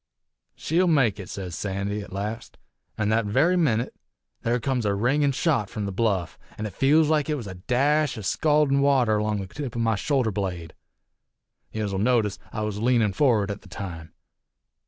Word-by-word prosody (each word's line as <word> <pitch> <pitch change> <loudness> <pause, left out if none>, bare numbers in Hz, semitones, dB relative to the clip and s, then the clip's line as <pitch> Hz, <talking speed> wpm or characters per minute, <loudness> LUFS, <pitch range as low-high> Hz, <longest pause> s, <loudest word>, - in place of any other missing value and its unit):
'She'll 175 +4 +1
make 130 - +3
it,' 95 - -8
sez 95 -3 -6
Sandy, 100 +2 -3
't 100 - -10
last 105 +4 -5 0.4
an' 105 -1 0
that 110 +1 +2
very 145 - +3
minit 125 -9 +1 0.5
there 120 +2 0
comes 125 +1 -1
a 100 -1 +1
ringin' 140 +7 +2
shot 130 - 0
from 105 -2 -4
the 100 - -3
bluff, 95 - -1 0.2
an' 110 - -4
I 105 - -4
feels 150 +7 +3
like 155 -1 +1
it 150 - +1
was 125 -6 -6
a 95 - -6
dash 135 +10 +1
o' - - -5
scaldin' 150 +6 +2
water 125 -7 +3
'long 105 -1 -1
the - - -5
tip 130 +5 -6
o' - - -1
my 115 -1 +2
shoulder 120 +2 0
blade. 90 -5 -4 1.0
Yez'll 105 -3 -2
notice, 110 -3 +1
I 110 - -4
was 105 -1 -3
leanin' 115 -3 +2
forrard 110 -4 +2
at 100 - -7
the 100 - -16
time. 85 -4 -7
110 Hz, 185 wpm, -25 LUFS, 100-135 Hz, 1.0 s, make